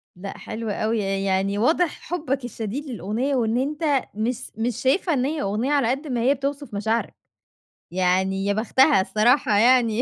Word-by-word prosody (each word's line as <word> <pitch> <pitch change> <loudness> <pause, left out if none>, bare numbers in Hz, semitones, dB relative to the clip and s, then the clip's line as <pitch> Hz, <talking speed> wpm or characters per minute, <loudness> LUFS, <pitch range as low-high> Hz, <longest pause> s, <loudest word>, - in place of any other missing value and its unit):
لأ 195 +2 -8
حلو 225 0 -6
أوي، 215 +2 -1
ي 195 -1 -1
يعني 195 +1 0
واضح 320 +8 +1
حبك 280 -7 -3
الشديد 235 +5 -5
للأغنية 240 - -2
وإن 230 -1 +1
أنت 290 0 0
مس 235 +4 -3
مش 230 0 -1
شايفها 310 +6 +2
إن 260 -1 +1
هي 305 +1 -2
أغنية، 215 +8 -1
على 280 -5 +2
قد 285 +4 -3
ما 245 -3 -1
هي 265 +4 +4
بتوصف 280 -2 -4
مشاعرك، 220 +3 -1 0.8
يعني 190 +2 +1
يا 200 - +1
بختها 240 +3 +3
الصراحة 215 +2 +2
يعني 240 0 +4
235 Hz, 170 wpm, -23 LUFS, 205-275 Hz, 0.8 s, هي